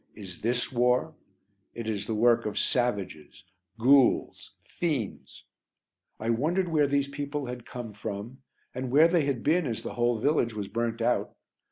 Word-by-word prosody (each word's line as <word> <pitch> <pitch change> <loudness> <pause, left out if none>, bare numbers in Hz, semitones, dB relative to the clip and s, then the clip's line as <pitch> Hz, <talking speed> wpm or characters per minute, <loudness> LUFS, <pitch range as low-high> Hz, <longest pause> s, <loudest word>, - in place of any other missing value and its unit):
Is 95 -5 -10
this 120 +2 0
war? 125 +5 +2 0.6
It 115 -2 -5
is 105 -2 -3
the 110 - -1
work 120 +1 +3
of 105 - -4
savages, 95 - -1 0.3
ghouls, 130 +3 +3
fiends. 145 - -4 0.8
I 110 +2 0
wondered 170 +10 0
where 150 -3 +3
these 140 0 +1
people 140 0 -4
had 125 -1 -7
come 120 -3 -7
from 105 +4 -6 0.3
and 130 0 -4
where 150 +6 +6
they 170 -3 +2
had 135 -5 -2
been 160 +1 +2
as 115 -3 -4
the - - -5
whole 120 -1 +1
village 120 -2 +1
was 105 -2 -4
burnt 115 +2 -2
out. 120 +1 0
120 Hz, 160 wpm, -28 LUFS, 110-140 Hz, 0.8 s, where